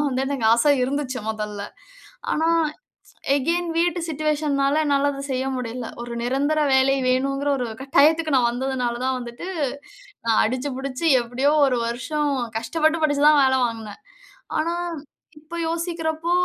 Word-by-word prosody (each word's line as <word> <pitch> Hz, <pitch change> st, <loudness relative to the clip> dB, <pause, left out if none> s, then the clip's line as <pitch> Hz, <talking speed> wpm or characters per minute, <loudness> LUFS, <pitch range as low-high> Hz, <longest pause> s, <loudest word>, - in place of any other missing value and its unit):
தான் 295 Hz, -, +1 dB
வந்து 260 Hz, +1 st, -1 dB
எனக்கு 270 Hz, -5 st, -1 dB
ஆச 235 Hz, -, +1 dB, 0.2 s
இருந்துச்சு, 265 Hz, -1 st, -2 dB
மொதல்ல. 210 Hz, -2 st, -5 dB, 0.7 s
ஆனா, 320 Hz, +1 st, +1 dB, 0.9 s
அகைன் 335 Hz, +5 st, 0 dB
வீட்டு 345 Hz, 0 st, +1 dB
சிட்யூயேஷன்னால 300 Hz, -1 st, 0 dB
என்னால 285 Hz, 0 st, +2 dB
அத 275 Hz, -1 st, -6 dB
செய்ய 260 Hz, 0 st, -1 dB
முடியல. 245 Hz, -1 st, -4 dB
ஒரு 240 Hz, 0 st, -6 dB
நிரந்தர 280 Hz, +5 st, +1 dB
வேலை 265 Hz, +1 st, +4 dB
வேணுங்குற 275 Hz, +2 st, 0 dB
ஒரு 250 Hz, -, -2 dB, 0.2 s
கட்டாயத்துக்கு 305 Hz, +3 st, +3 dB
நான் 245 Hz, -2 st, +4 dB
வந்ததுனால 250 Hz, -1 st, -2 dB
தான் 260 Hz, 0 st, 0 dB
வந்துட்டு, 240 Hz, +7 st, -8 dB, 0.8 s
நான் 225 Hz, -1 st, +3 dB
அடிச்சு 255 Hz, +5 st, -2 dB
புடிச்சு 270 Hz, +3 st, -4 dB, 0.2 s
எப்டியோ 250 Hz, +4 st, 0 dB, 0.2 s
1 250 Hz, -2 st, +1 dB
வருஷம் 290 Hz, +5 st, -1 dB, 0.3 s
கஷ்டப்பட்டு, 315 Hz, +7 st, 0 dB
படிச்சு 290 Hz, -1 st, +2 dB
தான் 300 Hz, -2 st, +5 dB
வேல 265 Hz, 0 st, +3 dB
வாங்கினே. 225 Hz, -3 st, -7 dB, 0.6 s
ஆனா, 335 Hz, +2 st, 0 dB, 0.6 s
இப்போ 315 Hz, +3 st, -9 dB
யோசிக்கிறப்போ 330 Hz, 0 st, -2 dB
275 Hz, 140 wpm, -23 LUFS, 250-310 Hz, 0.9 s, தான்